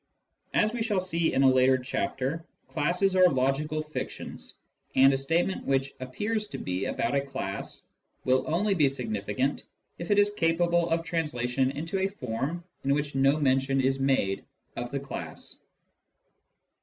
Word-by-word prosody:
As 215 +2 +3
we 240 - -3
shall 215 -4 +1
see 170 -3 0
in 135 - +2
a - - +7
later 130 0 +5
chapter, 130 +5 -2 0.2
classes 175 +5 +1
are 185 -1 +7
logical 150 +3 0
fictions, 155 0 -6 0.4
and 135 +1 +7
a - - +2
statement 165 +7 0
which 135 0 +1
appears 210 - -2
to - - -6
be 90 +1 -2
about 115 - -1
a 140 - +3
class 135 -8 -5 0.4
will 130 0 +3
only 195 +6 +1
be 155 -7 +4
signi 115 -7 -3
ficant 130 +8 -1 0.4
if 170 - -6
it 205 - +3
is 205 0 +4
capable 170 -1 +2
of 165 0 +1
translation 135 -6 0
into 165 +7 -3
a 190 - +2
form 145 - -4 0.2
in 140 +1 +2
which 145 0 -2
no 135 +2 +3
mention 135 -1 +2
is 135 +1 +1
made 130 -8 +1 0.3
of 120 0 -4
the 140 - -2
class. 140 0 -7
140 Hz, 160 wpm, -28 LUFS, 130-170 Hz, 0.4 s, a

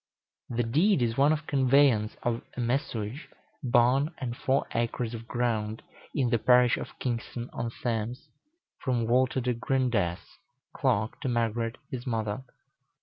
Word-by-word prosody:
The 120 0 0
deed 150 - +3
is 115 -1 0
one 140 +3 +4
of 155 0 -1
conveyance 135 -6 +3
of 120 -1 0 0.2
a - - -3
messuage, 120 +1 -2 0.3
barn, 125 +2 +3
and 120 -3 -4
four 135 +2 +1
acres 115 0 -1
of 115 0 -7
ground, 115 -3 -1 0.3
in 130 -5 +1
the 120 - +3
parish 125 +1 +5
of - - -7
Kingston 120 0 -4
on 115 - -2
Thames, 115 +1 -3 0.5
from 120 -3 0
Walter 130 +2 +2
de 125 0 0
Grendesse, 115 -8 -1 0.4
clerk, 115 -5 0
to 135 - -1
Margaret 115 -1 0
his 125 0 -5
mother. 110 +1 -2
120 Hz, 145 wpm, -28 LUFS, 115-130 Hz, 0.5 s, parish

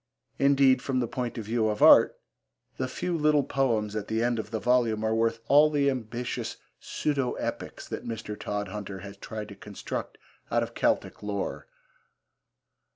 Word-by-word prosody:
Indeed, 135 -2 +5
from 130 -2 -1
the 120 - 0
point 120 0 -4
of 110 - -4
view 110 0 +1
of 105 -1 0
art, - - +7 0.6
the 130 - -1
few 175 +7 -3
little 150 -2 +3
poems 115 -7 0
at 105 -1 -3
the 110 +1 0
end 120 -1 +1
of 110 - -5
the 110 0 -2
volume 120 -3 +2
are 110 0 +1
worth 115 0 +1
all 150 +2 +6
the 140 -2 +2
ambitious 120 -1 -4 0.2
pseudo 140 -4 -1
epics - - -5
that - - -5
Mr. 110 -2 -5
Todhunter 105 -1 -5
has 100 0 -9
tried 105 +1 -7
to 100 - -9
construct 100 0 -6 0.3
out - - +2
of - - -6
Celtic - - 0
lore. 100 -2 -4
115 Hz, 165 wpm, -28 LUFS, 105-130 Hz, 0.6 s, art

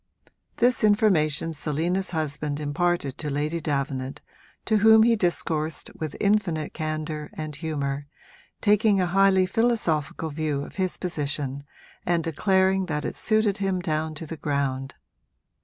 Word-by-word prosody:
This 245 -1 +2
information 175 -7 +3
Selina's 165 +6 -1
husband 150 -2 -2
imparted 150 -1 -1
to 150 - -3
Lady 150 +4 -1
Davenant, 135 -3 -2 0.5
to 220 - +3
whom 220 +1 +7
he 230 0 +4
discoursed 165 -5 -1
with 155 -2 -5
infinite 200 -7 +1
candour 155 -1 -4
and 155 -1 -5
humour, 145 -3 -3 0.5
taking 210 -1 +4
a 185 - +2
highly 190 +1 +4
philosophical 180 -8 0
view 150 -2 -2
of - - -11
his 185 -2 0
position 145 -5 -3 0.4
and 170 -1 +1
declaring 190 +3 +2
that 150 -3 -2
it - - -3
suited 215 -2 +1
him 195 -2 0
down 155 -2 -2
to 160 - -6
the 160 +1 -7
ground. 135 -3 -2
160 Hz, 135 wpm, -25 LUFS, 150-190 Hz, 0.5 s, whom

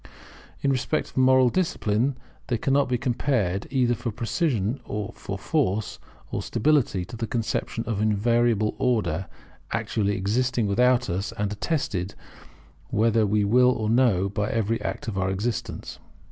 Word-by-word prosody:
In 140 - +3
respect 130 -2 -1
of - - -17
moral 130 -1 +5
discipline 130 - 0 0.3
they 120 - 0
cannot 135 +3 +2
be 125 - +1
compared 120 -6 0
either 125 -3 +2
for 120 +1 -3
precision, 115 - -1 0.3
for - - -6
force, 100 +3 -1 0.3
or - - -2
for - - -7
stability, 120 -9 +1
to 115 - -9
the 115 0 -3
conception 115 -1 -2
of 110 -3 -2
an 110 - +3
invariable 115 0 +2
Order, 95 -8 0 0.4
actually 100 -2 -1
existing 120 +5 0
without 125 +4 +3
us, 95 +3 -2
and 105 -1 -2
attested, 100 - -2 0.7
whether 110 0 +2
we 105 +1 +2
will 125 +5 +5
or 110 -3 0
no, 115 -6 +3
by 100 +1 -2
every 115 0 0
act - - -4
of 100 -4 -2
our 95 0 +1
existence. 105 +5 -3
115 Hz, 150 wpm, -25 LUFS, 100-125 Hz, 0.7 s, moral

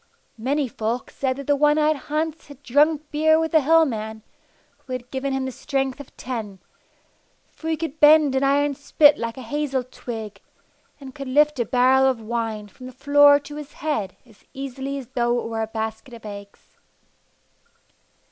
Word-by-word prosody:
Many 275 +4 0
folk 230 +1 -4
said 260 -1 -2
that 280 +1 -8
the 290 - +2
one 295 +1 +3
eyed 310 0 +3
Hans 310 +3 -4
had 285 -1 -14
drunk 295 +3 +2
beer 315 +1 +3
with 320 -1 -1
the 315 - +5
Hill 325 +3 +5
man, 220 -4 -5 0.6
who 255 - -9
had 250 0 -6
given 270 +1 -2
him 265 0 -1
the 260 - -4
strength 270 +1 -3
of 285 - -13
ten, 225 -6 -5 0.9
for 320 - -7
he 320 - 0
could 315 -1 -5
bend 300 -2 +6
an 265 +1 +1
iron 285 +1 +2
spit 290 +1 +4
like 230 +1 -4
a 260 - -7
hazel 275 +1 -2
twig, 225 -4 -8 0.6
and 270 -2 -10
could 275 -2 -7
lift 295 +1 +3
a 240 - +1
barrel 260 +2 +4
of 255 -3 -2
wine 220 -2 -4
from 255 +6 -12
the - - -9
floor 285 +1 +5
to 295 +1 -10
his 295 -1 -9
head 275 -11 -3
as 220 -4 -22
easily 270 +1 -5
as 270 - -7
though 240 -2 0
it - - -5
were 225 -1 -3
a 220 - -2
basket 220 +3 -5
of 230 - -14
eggs. 200 -1 -11
270 Hz, 185 wpm, -23 LUFS, 235-295 Hz, 0.9 s, bend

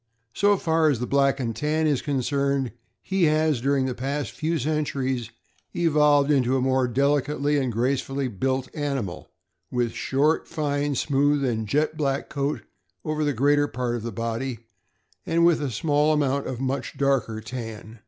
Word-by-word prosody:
So 205 0 +3
far 160 -2 +2
as 135 -6 0
the 125 - -2
Black 140 +1 +2
and 115 -4 -2
Tan 155 +1 0
is 145 -4 +1
concerned, 140 -1 0 0.3
he 190 -2 +1
has, 155 -4 +2
during 135 0 +1
the 130 - -1
past 140 +3 -3
few 165 +2 -1
centuries, 135 -4 -1 0.5
evoluted 150 -3 +4
into 130 0 +2
a - - +1
more 130 0 +2
delicately 140 +3 +1
and 130 -3 -1
gracefully 135 +3 -1
built 130 +4 -1
animal, 135 - -3 0.4
with 120 -2 0
short, 145 +7 +1
fine, 145 -3 -1
smooth, 145 +1 +2
and 110 -3 -1
jet 150 +6 0
black 140 -2 -1
coat 140 +1 -2 0.4
over 155 0 -1
the 145 - +1
greater 145 +4 +3
part 125 -2 -2
of 120 - -4
the 115 +1 -4
body, 115 +2 -3 0.6
and 170 +1 +2
with 170 -3 +4
a 145 - -1
small 150 +5 +2
amount 140 -2 0
of 125 - -4
much 135 +1 -3
darker 130 -6 +1
tan. 115 -1 -8
140 Hz, 165 wpm, -25 LUFS, 125-150 Hz, 0.6 s, evoluted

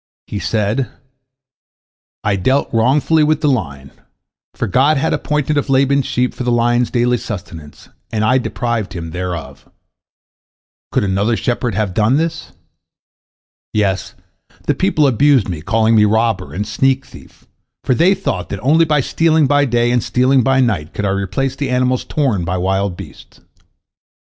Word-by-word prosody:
He 105 - -5
said: 110 +5 -1 1.3
"I 105 -1 +1
dealt 130 +10 0
wrongfully 140 +7 +3
with 155 0 +1
the 150 - +1
lion, 70 - -2 0.6
for - - -2
God 140 +9 +2
had 135 - 0
appointed 150 0 0
of 145 - -4
Laban's 135 0 +2
sheep 125 0 0
for - - -5
the 120 - 0
lion's 120 +1 +2
daily 125 0 +1
sustenance, 85 -9 -9 0.2
and 110 -1 -1
I 130 +4 +3
deprived 120 -4 -3
him 80 -2 -6
thereof. 90 -2 -6 1.2
Could - - +1
another 100 +4 0
shepherd 120 -3 -2
have 105 -3 -1
done 110 +6 +2
thus? 165 0 -3 1.2
Yes, 100 -3 -1 0.5
the - - +2
people 185 -6 +1
abused 135 -2 +3
me, 85 -5 -5
calling 110 +5 +1
me 105 -1 +5
robber 110 0 0
and 105 +3 -3
sneak 135 +4 +1
thief, - - -16 0.4
for - - +1
they 175 +9 +3
thought 195 - -3
that 100 - -5
only 155 +7 +4
by 150 -2 +2
stealing 160 +2 +2
by 145 +1 +3
day 120 -1 +1
and 125 -1 +2
stealing 130 +3 +2
by 135 +2 +2
night 100 -12 -1
could 105 - -2
I - - +1
replace 100 +8 -2
the 140 -1 -3
animals 125 0 +1
torn 130 - 0
by 90 +2 -2
wild 95 0 -1
beasts. - - -12
120 Hz, 160 wpm, -17 LUFS, 100-135 Hz, 1.3 s, me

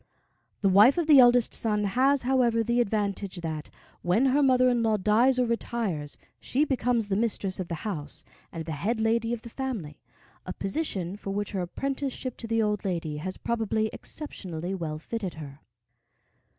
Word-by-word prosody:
The 200 - +3
wife 210 - +6
of 340 - +1
the 295 -4 +8
oldest 245 -1 +5
son 210 -2 0
has, 260 +7 +2
however, 245 -3 +2
the 235 +2 +2
advantage 200 -4 -2
that, 155 -2 -4 0.3
when 185 +9 +2
her 270 +2 +3
mother 255 -2 +4
in 245 -1 +2
law 220 -1 +2
dies 225 +6 +3
or 250 - +3
retires, 225 -10 -2 0.2
she 285 +4 0
becomes 245 -5 0
the 195 - 0
mistress 200 -3 -1
of 185 - -3
the 170 - -3
house 150 -9 -4 0.3
and 165 -1 -6
the 160 - -5
head 205 +10 -1
lady 230 +1 +1
of 240 -2 -3
the 235 - -8
family, 225 - -5 0.4
a - - -5
position 195 - -3
for 200 - -7
which 205 +1 -2
her 190 - -2
apprenticeship 265 +5 -3
to 230 - -6
the 225 0 +1
old 210 -1 -1
lady 165 -5 -2
has 185 +5 -5
probably 220 -1 -1
exceptionally 185 - -5
well 160 -5 -3
fitted 190 +3 -5
her. 145 -3 -9
220 Hz, 175 wpm, -27 LUFS, 185-245 Hz, 0.4 s, the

